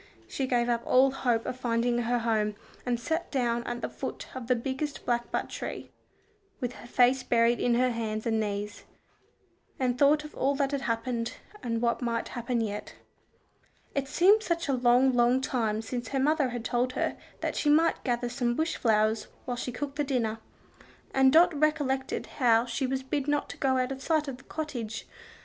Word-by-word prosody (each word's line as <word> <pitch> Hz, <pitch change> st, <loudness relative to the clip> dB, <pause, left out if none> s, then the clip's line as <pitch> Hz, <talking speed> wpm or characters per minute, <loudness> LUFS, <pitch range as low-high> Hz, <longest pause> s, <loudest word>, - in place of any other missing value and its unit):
She 270 Hz, -, -2 dB
gave 240 Hz, -2 st, +2 dB
up 235 Hz, -1 st, +1 dB
all 265 Hz, +1 st, +4 dB
hope 240 Hz, -4 st, 0 dB
of 250 Hz, -, -4 dB
finding 240 Hz, 0 st, +1 dB
her 240 Hz, +1 st, +1 dB
home, 220 Hz, -3 st, 0 dB, 0.3 s
and 240 Hz, -1 st, +1 dB
sat 320 Hz, +8 st, -2 dB
down 240 Hz, -3 st, 0 dB
at 240 Hz, 0 st, -4 dB
the -, -, -1 dB
foot -, -, -6 dB
of 255 Hz, -3 st, -6 dB
the 250 Hz, -, +3 dB
biggest 265 Hz, +4 st, -4 dB
blackbutt 240 Hz, -1 st, -1 dB
tree, -, -, -6 dB, 0.7 s
with 250 Hz, -3 st, -3 dB
her 240 Hz, -, -12 dB
face 250 Hz, +2 st, +4 dB
buried 235 Hz, 0 st, +3 dB
in 240 Hz, -1 st, +2 dB
her 250 Hz, +1 st, +3 dB
hands 220 Hz, -2 st, -3 dB
and 225 Hz, -1 st, +1 dB
knees, 205 Hz, -1 st, -3 dB, 1.0 s
and 250 Hz, -1 st, 0 dB
thought 295 Hz, +1 st, +5 dB
of 300 Hz, -, -10 dB
all 275 Hz, +2 st, +1 dB
that 275 Hz, -1 st, 0 dB
had 280 Hz, -1 st, -1 dB
happened, 230 Hz, -1 st, -2 dB, 0.3 s
and 230 Hz, -1 st, -2 dB
what 235 Hz, +1 st, +1 dB
might 230 Hz, -1 st, -1 dB
happen 240 Hz, -1 st, -2 dB
yet. 210 Hz, -2 st, -4 dB, 1.0 s
It 275 Hz, -1 st, -1 dB
seemed 385 Hz, +9 st, +5 dB
such 340 Hz, -6 st, -1 dB
a 275 Hz, -, +1 dB
long, 250 Hz, +1 st, +4 dB
long 245 Hz, +1 st, +4 dB
time 225 Hz, -5 st, -1 dB
since 240 Hz, 0 st, -4 dB
her 270 Hz, -, -1 dB
mother 290 Hz, 0 st, +2 dB
had 240 Hz, -2 st, -5 dB
told 250 Hz, +2 st, 0 dB
her -, -, -1 dB, 0.3 s
that -, -, -2 dB
she 295 Hz, -, +1 dB
might 320 Hz, +3 st, +3 dB
gather 245 Hz, -1 st, 0 dB
some 240 Hz, -1 st, -1 dB
bush 320 Hz, +4 st, -1 dB
flowers 215 Hz, -1 st, +2 dB, 0.2 s
while 245 Hz, -, -2 dB
she 250 Hz, +1 st, -4 dB
cooked 280 Hz, +3 st, -5 dB
the 295 Hz, -, +1 dB
dinner, 235 Hz, -5 st, -1 dB, 0.7 s
and 265 Hz, 0 st, +5 dB
Dot 340 Hz, +3 st, +6 dB
recollected 285 Hz, -3 st, 0 dB
how 235 Hz, -3 st, +3 dB
she 260 Hz, +2 st, -2 dB
was 265 Hz, 0 st, -2 dB
bid 275 Hz, +1 st, -2 dB
not 290 Hz, 0 st, 0 dB
to -, -, -8 dB
go 265 Hz, -1 st, +2 dB
out 255 Hz, +1 st, 0 dB
of 270 Hz, 0 st, -5 dB
sight 310 Hz, 0 st, +1 dB
of 265 Hz, -2 st, -5 dB
the 265 Hz, -, -17 dB
cottage. 245 Hz, -9 st, -5 dB
250 Hz, 195 wpm, -28 LUFS, 235-270 Hz, 1.0 s, Dot